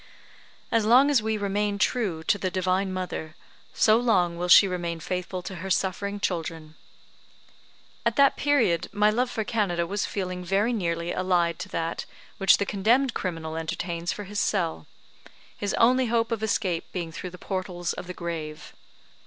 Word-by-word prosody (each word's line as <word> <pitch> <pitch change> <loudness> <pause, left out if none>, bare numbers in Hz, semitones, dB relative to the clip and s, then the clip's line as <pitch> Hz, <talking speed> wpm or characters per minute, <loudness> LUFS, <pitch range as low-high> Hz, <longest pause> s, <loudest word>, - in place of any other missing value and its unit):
As 230 -2 +3
long 255 +6 +5
as 265 -6 +4
we 220 0 -1
remain 205 0 -1
true 200 -7 0
to 205 - +1
the 185 - -1
Divine 185 +1 0
Mother, 180 -4 -5 0.4
so 215 0 +4
long 190 -8 +2
will 175 +1 -3
she 185 +3 +8
remain 175 -2 -3
faithful 180 +2 -4
to 190 - -6
her 190 +3 -6
suffering 200 +2 -1
children. 165 -4 -3 1.3
At - - +1
that 280 -1 +5
period 240 - +2
my 210 +1 +3
love 245 +3 0
for 225 -3 -2
Canada 200 -6 0
was 200 +4 -2
a - - -7
feeling 185 -2 -4
very 200 +6 +1
nearly 170 -4 -1
allied 175 -3 +1
to - - -6
that 165 0 -3 0.3
which 195 - +6
the 200 - -1
condemned 230 +7 +2
criminal 165 -3 -4
entertains 170 +2 -3
for 205 - -5
his 205 +1 -4
cell 165 - -1 0.7
his 200 -1 -2
only 250 +2 +4
hope 230 0 +1
of 225 -2 -1
escape 190 -5 -1
being 170 -3 -4
through 180 +3 -6
the 180 - -11
portals 180 -2 -3
of - - -8
the 180 - -6
grave. 160 -3 -6
185 Hz, 170 wpm, -26 LUFS, 170-215 Hz, 1.3 s, she